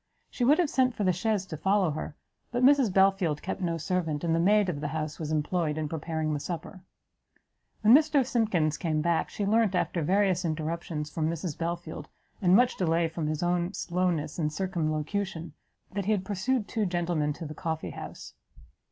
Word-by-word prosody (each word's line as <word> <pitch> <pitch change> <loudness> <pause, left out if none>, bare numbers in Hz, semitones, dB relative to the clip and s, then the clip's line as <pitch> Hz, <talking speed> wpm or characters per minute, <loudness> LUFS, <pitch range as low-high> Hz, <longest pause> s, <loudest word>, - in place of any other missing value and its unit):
She 245 - -2
would 285 +5 +5
have 340 -5 +1
sent 255 -2 +2
for 210 - -2
the 185 -2 +3
chaise 205 +1 0
to 175 - -6
follow 190 +1 +2
her; 150 0 -5 0.4
but 245 +1 0
Mrs 270 -5 +5
Belfield 190 -5 +2
kept 190 - -4
no 170 -2 -1
servant, 165 -3 -2
and 165 -1 +1
the 165 - +2
maid 205 +3 +4
of 150 -5 -3
the 150 - -2
house 155 0 -4
was 155 -1 -4
employed 155 0 0
in 155 -1 -1
preparing 160 0 -2
the 145 - -1
supper. 175 +4 -6 1.0
When 215 +2 +7
Mr 295 -2 +5
Simkins 190 - +1
came 155 -3 0
back, 170 -1 +1
she 205 - -3
learnt, 215 -1 +2
after 175 - 0
various 185 +2 +2
interruptions 155 -1 -3
from 160 0 -1
Mrs 165 -1 -3
Belfield, 170 -2 -4 0.3
and 180 -1 +5
much 245 +3 +4
delay 165 -2 +1
from 160 -1 -3
his 155 +2 -2
own 175 +2 0
slowness 175 -3 -1
and 150 -2 0
circumlocution, 165 0 -2 0.4
that 200 -1 -3
he 215 - +3
had 190 -3 -2
pursued 210 +4 0
the - - -16
two 220 -3 0
gentlemen 175 -4 0
to 165 +3 -8
the 150 - -6
coffee 160 +1 -4
house. - - -9
175 Hz, 195 wpm, -28 LUFS, 155-200 Hz, 1.0 s, When